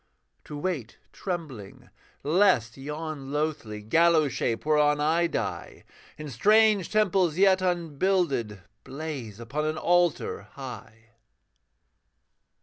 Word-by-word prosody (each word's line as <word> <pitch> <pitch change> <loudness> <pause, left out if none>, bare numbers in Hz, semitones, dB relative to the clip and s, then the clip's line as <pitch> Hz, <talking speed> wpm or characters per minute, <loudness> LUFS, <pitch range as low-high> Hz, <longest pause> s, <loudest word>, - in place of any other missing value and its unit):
To 150 - -7
wait 145 -8 -4 0.2
trembling, 150 - -7 0.3
lest 155 - +3
yon 150 0 -6
loathly 145 -9 -3
Gallows 160 +4 +3
shape 115 +3 -2
whereon 150 -1 +3
I 165 +3 +2
die, - - -5 0.3
In 155 0 -7
strange 210 - +3
temples 190 -6 +2
yet 190 -1 +4
unbuilded, 165 - -1 0.2
Blaze 135 -8 -7
upon 135 +6 -3
an 155 0 -2
altar 175 - +1
high. 115 -4 -10
150 Hz, 100 wpm, -26 LUFS, 125-175 Hz, 0.3 s, yet